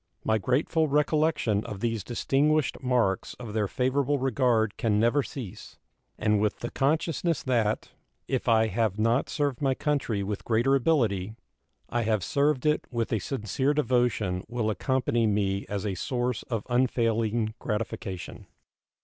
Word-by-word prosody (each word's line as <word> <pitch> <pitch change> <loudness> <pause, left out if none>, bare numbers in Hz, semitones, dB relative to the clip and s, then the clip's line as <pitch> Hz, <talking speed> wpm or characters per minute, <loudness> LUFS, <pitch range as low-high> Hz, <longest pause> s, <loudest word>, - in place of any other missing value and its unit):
My 110 0 +2
grateful 150 - +1
recollection 150 -6 +1
of 100 - -6
these 115 -2 -1
distinguished 140 +5 +1
marks 120 -7 0
of 115 -4 -8
their 105 -2 +1
favorable 135 +6 +1
regard 120 -4 +1
can 105 -2 +1
never 120 +6 +3
cease, 125 -8 -8 0.4
and 105 -1 +2
with 105 -1 -1
the 120 - -4
consciousness 160 +3 0
that, 115 -5 0 0.4
if 130 -2 -1
I 110 -1 +5
have 110 -1 0
not 115 +4 +1
served 145 -4 -1
my 135 -2 +2
country 135 -10 -1
with 100 +1 -4
greater 120 +4 +2
ability, 115 - +1 0.5
I 120 - -1
have 110 -4 0
served 140 +2 +1
it 150 0 +1
with 115 -2 -2
a 110 - +1
sincere 135 +5 -1
devotion 120 -10 +1
will 120 -3 -1
accompany 120 -1 +1
me 100 -2 0
as 100 0 -3
a 100 - -1
source 120 +5 -2
of 115 -4 -2
unfailing 115 -3 +1
gratification. 105 -4 -4
120 Hz, 145 wpm, -27 LUFS, 105-135 Hz, 0.5 s, I